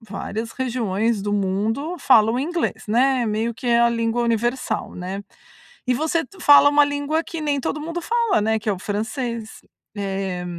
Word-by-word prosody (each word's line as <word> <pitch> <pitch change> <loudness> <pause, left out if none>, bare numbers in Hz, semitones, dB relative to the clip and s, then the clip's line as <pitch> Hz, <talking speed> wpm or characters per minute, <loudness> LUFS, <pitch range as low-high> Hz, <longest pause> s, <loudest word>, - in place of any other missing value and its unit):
várias 220 +1 -5
regiões 230 -4 -1
do 205 0 -2
mundo 210 - -1
falam 225 -4 +4
inglês, 310 -6 -2
né, 250 +3 +3
meio 220 +2 -1
que 235 - -8
é 235 -1 +4
a 235 - +5
língua 230 0 0
universal, 240 +2 -1
né. 185 +3 -5 0.6
E 250 - +2
você 320 +5 0
t 395 - -18
fala 285 -3 +7
uma 290 0 +5
língua 285 +2 -1
que 330 -1 -7
nem 290 -2 0
todo 300 - -3
mundo 335 +3 -4
fala, 465 - +1
né, 220 +1 +1
que 220 +1 -6
é - - +3
o 190 - -5
francês. 225 +3 -4 0.4
Eh, 195 -2 -3
235 Hz, 175 wpm, -22 LUFS, 215-285 Hz, 0.6 s, fala